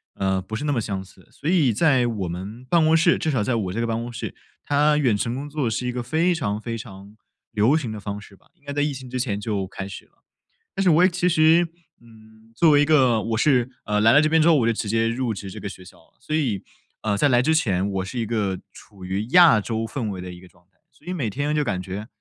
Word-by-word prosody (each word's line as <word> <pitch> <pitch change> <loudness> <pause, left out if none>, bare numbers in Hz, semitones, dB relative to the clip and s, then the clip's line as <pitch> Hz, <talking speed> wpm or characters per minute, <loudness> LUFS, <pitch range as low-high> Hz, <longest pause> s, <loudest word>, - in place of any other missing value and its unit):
呃， 95 -1 0
不 105 +4 -7
是 120 - -4
那 150 - 0
么 130 - 0
相 100 -3 -3
似。 95 - -20
所 150 - -5
以 155 -10 +3
在 130 -1 +3
我 105 -6 -3
们 100 +8 -7
办 160 +4 +3
公 160 +1 +4
室 170 +1 +4
至 160 - -2
少 130 -8 0
在 120 +3 0
我 95 -5 -2
这 115 - -2
个 115 - -1
办 115 0 -2
公 120 +1 -6
室， 120 - -6 0.3
它 150 +1 +2
远 130 -8 +2
程 115 +4 -2
工 140 +3 -6
作 145 -5 -1
是 120 +3 -3
一 125 - -1
个 125 0 -4
非 160 +9 +1
常 110 -10 -2
非 115 0 -4
常 100 -1 -11 0.3
流 115 +5 +3
行 130 -8 -4
的 110 - -6
方 100 0 -5
式 105 - -15
吧， - - -29
应 165 - -36
该 140 - -5
在 145 +1 -1
疫 145 0 0
情 130 -1 -9
之 130 +1 -3
前 115 -6 -1
就 100 -2 -3
开 95 0 -7
始 100 - -9
了。 - - -36 0.5
但 195 - 0
是 185 - +4
我 160 +1 +5
也 - - +4
其 180 0 0
实， 165 +1 +4 0.4
嗯， 110 -1 -19
作 155 +7 +4
为 145 -1 +5
一 - - +4
个 130 -7 +3
我 110 +1 -2
是， 125 -1 +2 0.2
呃， 105 0 0
来 110 +1 +6
到 140 - +7
这 155 - +3
边 160 +1 +3
之 160 - +5
后 165 - +6
我 120 -4 +2
就 115 - +2
直 105 -1 -4
接 115 +1 +1
入 120 0 -1
职 100 -1 -7
这 - - -9
个 100 - -5
学 95 -2 -12
校 90 - -15
了， - - -28
所 155 - -3
以， 120 -11 -1 0.4
呃， 105 -2 0
在 145 +8 +2
来 120 -1 +3
之 160 - +2
前 100 - +1
我 95 -1 -2
是 100 +6 -7
一 115 - -1
个 105 -4 -1 0.2
处 95 -3 -13
于 95 +4 -3
亚 170 -9 +7
洲 115 +1 -3
氛 115 -1 -4
围 95 -2 -5
的 90 0 -7
一 90 - -13
个 90 - -14
状 90 0 -26
态。 - - -42
所 - - -26
以 180 - -2
每 140 -11 -2
天 145 +7 -2
就 150 - +1
感 100 -9 -2
觉 95 +3 -6
115 Hz, 305 characters per minute, -23 LUFS, 105-145 Hz, 0.5 s, 到